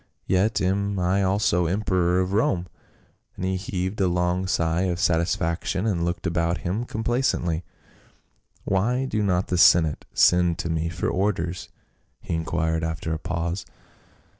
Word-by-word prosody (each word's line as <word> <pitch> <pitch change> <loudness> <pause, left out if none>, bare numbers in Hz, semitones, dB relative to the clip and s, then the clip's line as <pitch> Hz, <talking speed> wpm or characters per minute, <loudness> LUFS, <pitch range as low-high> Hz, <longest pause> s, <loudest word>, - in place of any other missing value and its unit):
"Yet 95 +4 +1
am 100 +2 0
I 90 +2 +1
also 95 -3 +2
emperor 90 -1 +1
of 95 +1 -2
Rome," 95 -4 +1 0.7
and 90 - -4
he 95 0 0
heaved 95 +1 -3
a 95 - +3
long 90 +1 0
sigh 85 0 +1
of 85 -1 -2
satisfaction 85 +2 0
and 90 -6 0
looked 85 +2 -2
about 85 0 0
him 100 +7 -1
complacently. 110 -8 -1 0.5
" - - -39
Why 120 +7 +1
do 110 -5 -1
not 95 -3 0
the 90 - 0
senate 80 -4 +5
send 90 -1 +4
to 85 - -3
me 80 0 -1
for 85 +1 -3
orders 90 -2 -1 0.3
?" - - -44
he - - -5
inquired 80 0 -1
after 80 0 -3
a 80 - -3
pause. 85 +2 -3
90 Hz, 155 wpm, -24 LUFS, 85-95 Hz, 0.7 s, senate